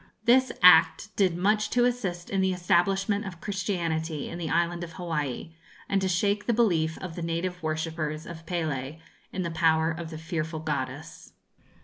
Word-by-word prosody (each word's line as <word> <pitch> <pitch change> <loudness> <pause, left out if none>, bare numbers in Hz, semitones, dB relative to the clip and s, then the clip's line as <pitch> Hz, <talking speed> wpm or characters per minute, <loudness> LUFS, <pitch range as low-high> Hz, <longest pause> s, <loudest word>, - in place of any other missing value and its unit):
This 260 +3 +4
act 170 +3 +6
did 185 -4 +2
much 210 +3 +2
to 245 0 +3
assist 195 -9 -2
in 195 -1 +1
the 190 0 +2
establishment 195 +3 +1
of 185 -5 -8
Christianity 165 -6 -2
in 170 - -6
the 165 -2 -3
Island 170 +1 0
of 165 -1 -8
Hawaii, 160 -3 -3 0.3
and 195 -1 +1
to 190 - +1
shake 200 +3 0
the 240 - +3
belief 165 -9 +2
of 180 -3 -7
the 175 - -5
native 170 +2 -2
worshippers 155 -1 -3
of 160 -1 -10
Pélé 155 -4 -3 0.3
in 185 - -3
the 170 - -3
power 160 0 +2
of 165 0 -6
the 160 - -7
fearful 160 0 -3
goddess. 145 -1 -5
170 Hz, 170 wpm, -27 LUFS, 160-190 Hz, 0.3 s, act